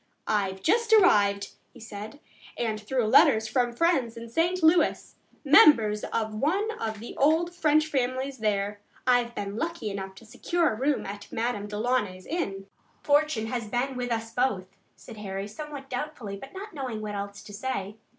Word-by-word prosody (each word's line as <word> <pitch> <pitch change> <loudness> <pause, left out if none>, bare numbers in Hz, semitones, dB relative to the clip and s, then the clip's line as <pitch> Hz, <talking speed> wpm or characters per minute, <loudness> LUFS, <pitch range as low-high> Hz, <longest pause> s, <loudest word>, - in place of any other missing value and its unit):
"I've 195 -3 -1
just 460 +5 +2
arrived," 205 - +4 0.2
he 245 - -15
said, 220 +4 -9 0.4
"and 220 -3 -2
through 245 +2 -1
letters 220 -2 +5
from 240 +2 +1
friends 250 -4 +1
in 230 0 -8
St. 340 +7 0
Louis, 325 +2 +3 0.3
members 230 -8 +6
of 220 -1 -2
one 370 - 0
of 220 -1 -3
the 230 - -8
old 320 +5 +2
French 310 -3 +3
families 260 -2 -2
there, 205 -1 -1 0.3
I've 245 -1 +2
been 200 +1 -4
lucky 320 -8 -3
enough 195 -1 -6
to 230 - -14
secure 335 +6 0
a - - -4
room 275 +5 0
at 200 +1 -8
Madame 225 -3 -2
Delaunay's 210 -3 -1
inn." 195 - -3 0.4
"Fortune 290 -6 +2
has 230 -1 -3
been 250 +4 -1
with 245 -1 -3
us 225 0 -3
both," 220 -7 0 0.3
said 225 - -12
Harry, 195 -1 -5
somewhat 285 +4 -8
doubtfully, 250 -6 -5
but 270 +7 -10
not 400 +2 -8
knowing 255 -7 -4
what 210 -1 -4
else 200 0 -6
to 205 - -12
say. 205 -3 -4
235 Hz, 170 wpm, -27 LUFS, 210-290 Hz, 0.4 s, members